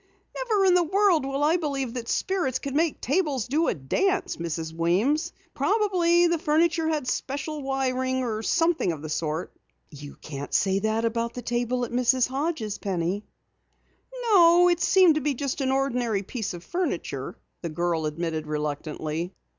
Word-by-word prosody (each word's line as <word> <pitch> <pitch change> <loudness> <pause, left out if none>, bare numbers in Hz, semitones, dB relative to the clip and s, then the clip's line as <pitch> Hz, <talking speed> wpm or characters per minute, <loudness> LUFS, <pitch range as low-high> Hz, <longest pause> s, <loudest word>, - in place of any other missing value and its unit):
"Never 440 -6 +1
in 370 - +5
the 360 - +5
world 355 -4 +2
will 275 +1 -1
I 320 +4 +4
believe 275 -7 -3
that 235 -2 -5
spirits 355 -10 0
can 275 -1 -5
make 320 0 +1
tables 285 - 0
do 310 +6 +1
a - - +1
dance, 370 - 0
Mrs. 165 -1 -4
Weems! 215 - +1 0.2
Probably 350 0 +2
the 340 -1 +1
furniture 320 +1 +2
had 305 -5 -1
special 285 +4 -3
wiring 260 -1 -1
or 220 -3 -2
something 330 - +1
of 155 -2 -7
the 155 - -5
sort." 155 +2 -3 0.4
"You 145 -1 -10
can't 145 -2 -6
say 195 -1 +2
that 220 +2 0
about 230 +1 -1
the 245 - -6
table 245 +1 -1
at - - -10
Mrs. 250 +1 +2
Hodges', 265 -6 -2
Penny." 190 +1 -2 1.0
"No, 350 -2 +7
it 350 -1 +2
seemed 365 0 +5
to 305 - -1
be 285 0 0
just 275 +2 -3
an 265 -1 +1
ordinary 250 -6 0
piece 215 -2 -4
of 175 - -10
furniture," 355 - -3 0.2
the 170 - -4
girl 165 0 -1
admitted 160 0 -3
reluctantly. 155 +3 -3
260 Hz, 165 wpm, -26 LUFS, -, 1.0 s, No